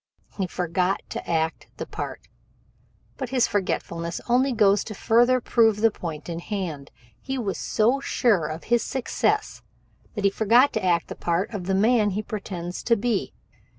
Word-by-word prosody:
He 190 -3 -1
forgot 180 +2 -1
to - - -6
act 160 -1 -1
the - - -4
part. - - -7 0.9
But 260 -3 -4
this 255 -2 +3
forgetfulness 170 -4 -2
only 255 +3 +3
goes 205 -3 +3
to 215 - -7
further 240 +5 +3
prove 225 -3 +3
the 225 0 +5
point 160 -6 -6
in 170 -1 -4
hand. 170 -8 -5 0.3
He 270 0 -4
was 205 -6 -3
so 235 +6 +2
sure 215 - +1
of 155 +2 -6
success 240 +2 0 0.5
that 205 - -3
he 200 - +4
forgot 230 +7 +4
to 220 - -2
act 175 -2 +2
the - - -7
part 175 +6 -1
of 190 -4 -4
the 190 +1 0
man 215 +1 +3
he 205 +2 -2
pretends 185 -5 -5
to 235 - +4
be. 225 -1 -1
205 Hz, 165 wpm, -25 LUFS, 175-235 Hz, 0.9 s, the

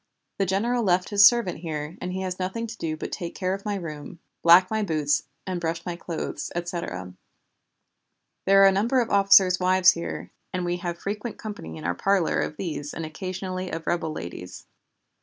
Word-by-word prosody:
The 195 - +1
general 230 +6 +1
left 180 -4 +2
his 205 -1 +8
servant 235 -7 +1
here, 155 -1 -5
and 180 - -3
he 190 +1 -3
has 185 -1 -4
nothing 190 +5 -2
to 230 0 -7
do 160 -7 -3
but - - -6
take 170 -1 -5
care 185 0 -1
of 195 +1 -6
my 205 -1 -1
room, 155 -4 -7 0.2
black 175 +3 +7
my 220 0 0
boots, 155 -7 0 0.2
and 185 -2 -3
brush 165 0 -3
my 175 -2 -3
clothes, 165 -4 -5
etc. 170 - -4 1.3
There 195 0 +7
are - - +9
a - - +6
number 230 +7 +2
of 235 -2 -1
officers' 195 -2 +6
wives 185 0 +5
here, 170 - -6 0.2
and 180 -1 -2
we 175 0 -1
have 175 -1 -4
frequent 210 +5 -5
company 205 - -7
in 80 - -9
our 85 - 0
parlor 190 - +1
of 150 - -3
these 150 -5 -4
and 165 - -4
occasionally 185 +2 -5
of 165 0 -5
rebel 170 -2 -1
ladies. 90 - -8
180 Hz, 195 wpm, -25 LUFS, 165-195 Hz, 1.3 s, are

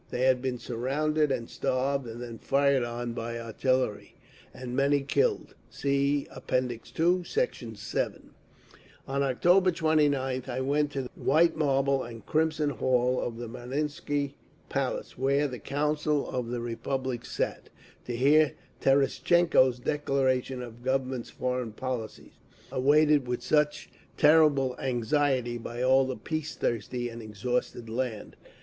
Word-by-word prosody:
They 125 - -3
had 130 -1 +4
been 130 -1 -2
surrounded 140 +6 0
and 115 -3 -2
starved, 135 0 -1
and 115 +2 -7
then 115 -2 -8
fired 140 -1 +2
on 120 0 -4
by 115 0 -4
artillery, 115 0 -1 0.4
and 125 -1 -7
many 140 +1 +3
killed. 430 - 0 0.2
(See 140 0 0
App. - - -11
II, 130 +9 +1
Sect. 485 - 0 0.2
7)… - - -3 0.8
On 140 0 -1
October 175 +8 +4
29th 145 -6 +1
I 125 +1 -2
went 145 +2 +1
to 135 - -2
the 125 - -7
white 160 +5 +3
marble 135 -2 +2
and 115 -2 -9
crimson 155 -1 +1
hall 125 0 +1
of 115 -1 -4
the 120 0 -5
Marinsky 140 +4 -3 0.4
palace, - - -3
where 140 +2 +2
the 125 -3 -7
Council 150 +1 0
of 125 -2 -3
the 120 0 -3
Republic 120 +1 -3
sat, - - -3 0.4
to 120 - -2
hear 145 +4 +4 0.3
Terestchenko's 135 0 +3
declaration 130 -1 0
of 120 -1 -10
the 120 - -17
Government's 130 -2 -1
foreign 125 -3 -3
policy, 125 -2 -5 0.4
awaited 145 +1 +4
with 125 0 -2
such 150 -1 +1 0.3
terrible 150 -4 +5
anxiety 125 -1 0
by 120 +2 -5
all 130 +1 +4
the 130 - -3
peace 155 +7 -4
thirsty 120 +1 -2
and 115 0 -8
exhausted 115 +2 -3
land. 115 -2 -4
130 Hz, 135 wpm, -28 LUFS, 120-145 Hz, 0.8 s, terrible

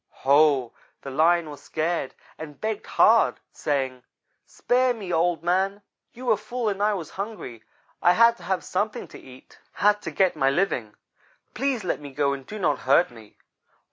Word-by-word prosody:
Ho! 140 -3 +4 0.3
The 135 - -6
Lion 165 +4 +3
was 145 - -11
scared 160 -3 -2 0.2
and 150 -2 -9
begged 215 -1 -3
hard, - - +4
saying: 135 -3 -2 0.5
"'Spare 250 0 +1
me, 195 -6 -5
Old 170 0 +1
man. 190 +3 0 0.3
You 255 +2 -10
were 225 -4 +3
full 235 +2 -3
and 200 -1 -3
I 210 0 +2
was 170 -5 -6
hungry. 195 - -7 0.4
I 175 - +5
had 230 +3 +5
to - - -15
have 190 0 -1
something 205 +3 -2
to - - -11
eat; 130 0 -16
had 210 0 +2
to - - -5
get 180 +3 +1
my 135 -3 +2
living. 135 - -1 0.6
Please 265 -5 -1
let 180 - -2
me 145 -1 -9
go 140 +1 0
and 135 -1 -8
do 215 - -7
not 160 -8 0
hurt 140 +5 +3
me.' 110 -3 -16
175 Hz, 175 wpm, -25 LUFS, 140-210 Hz, 0.6 s, I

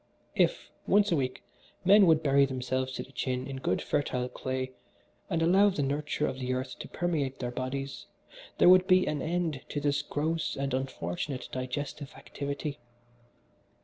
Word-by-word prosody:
"If, - - +1 0.2
once 205 0 +4
a - - +4
week, 130 -3 -2 0.4
men 200 +1 +7
would 160 -1 +4
bury 140 -1 +5
themselves 130 0 -2
to - - -4
the 135 - -17
chin 130 0 -2
in 135 0 -5
good 110 -8 -1
fertile 125 -3 -1
clay, 130 0 -3 0.6
and 165 0 +1
allow 195 +5 +5
the 165 -7 -1
nurture 145 +2 -1
of 130 - -3
the 130 0 -1
earth 130 0 -5
to - - -6
permeate 150 -7 -1
their 120 -1 -3
bodies 135 +2 -4 0.5
there - - +5
would 185 +1 +7
be 185 0 +5
an 150 -2 -1
end 165 -4 -1
to 145 - -2
this 145 0 +1
gross 155 +3 -2
and 140 -1 -2
unfortunate 130 - -3
digestive 135 +2 -4
activity. 140 +1 -5
140 Hz, 165 wpm, -29 LUFS, 130-160 Hz, 0.6 s, men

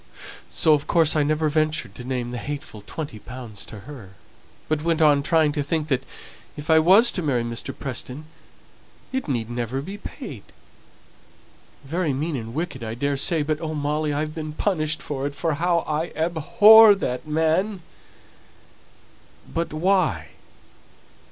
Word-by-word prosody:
So, 155 - +3
of 145 -1 0
course, 165 -3 +3
I 155 - +3
never 155 +2 +1
ventured 155 -7 0
to 125 - -9
name 125 -1 -3
the 125 - -4
hateful 140 -7 -6
twenty 130 +1 -7
pounds 120 -3 -8
to 105 - -10
her, 110 -8 -11 0.5
but 155 -1 0
went 165 0 0
on 150 -3 +5
trying 155 +1 +2
to 145 0 -2
think 155 +2 -2
that 130 -3 +1 0.6
if 150 +2 -3
I 160 - +7
was 195 +9 +6
to 180 - -3
marry 135 -7 0
Mr. 120 0 -4
Preston, 130 +3 -6 0.9
it 265 -5 -2
need 120 -6 -1
never 120 +2 -3
be 195 +9 -7
paid - - -8 1.4
very 160 +1 -1
mean 150 +4 -2
and 115 -1 -6
wicked, 155 -6 -4
I 110 0 -4
daresay; 140 +4 +1
but 155 +1 -2
oh, 155 -1 -3
Molly, 150 +1 -1
I've 150 +1 -2
been 155 -2 -5
punished 155 -3 -1
for 140 -1 -3
it, 145 - -7
for 165 0 -1
how 170 +3 +1
I 155 +2 -1
abhor 205 +7 +7
that 125 -7 -4
man." 160 +5 0 1.7
"But 170 +1 -2
why? 155 - +1
150 Hz, 155 wpm, -23 LUFS, 135-165 Hz, 1.7 s, I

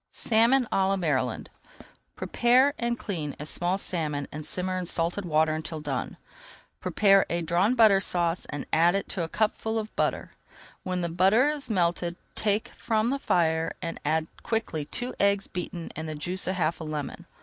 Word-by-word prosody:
SALMON 235 +3 +3
À 190 -1 +2
LA 195 - +2
MARYLAND 130 -9 -1 0.6
Prepare 255 +4 +3
and 235 0 -1
clean 155 - -4
a 150 - -5
small 175 +4 0
salmon 150 -7 -3
and 155 +1 -6
simmer 185 +4 -2
in 185 -1 -2
salted 175 +4 0
water 155 -1 +2
until 155 0 -4
done. 145 -4 -4 0.6
Prepare 195 -2 +4
a 170 0 -1
Drawn 180 +8 +2
Butter 215 -5 +6
Sauce 175 -2 0
and 145 -1 -5
add 170 +2 +5
to - - +4
it - - -28
half - - 0
a - - -9
cupful 220 +2 0
of 220 -1 -4
butter. - - -1 0.5
When 185 -1 -2
the 170 - -1
butter 195 - +4
is 295 -3 -4
melted, 175 -3 0 0.2
take 210 0 0
from 220 +2 0
the 275 - -1
fire 165 - +1
and 165 -2 -5
add 155 +2 +1 0.2
quickly 220 -10 -2
two 245 - -4
eggs 200 0 +3
beaten 175 -1 -6
with 160 - -5
the 155 - -4
juice 175 +5 -3
of 190 - 0
half 165 -1 -1
a - - -4
lemon. 155 -2 -5
180 Hz, 180 wpm, -27 LUFS, 160-215 Hz, 0.6 s, Butter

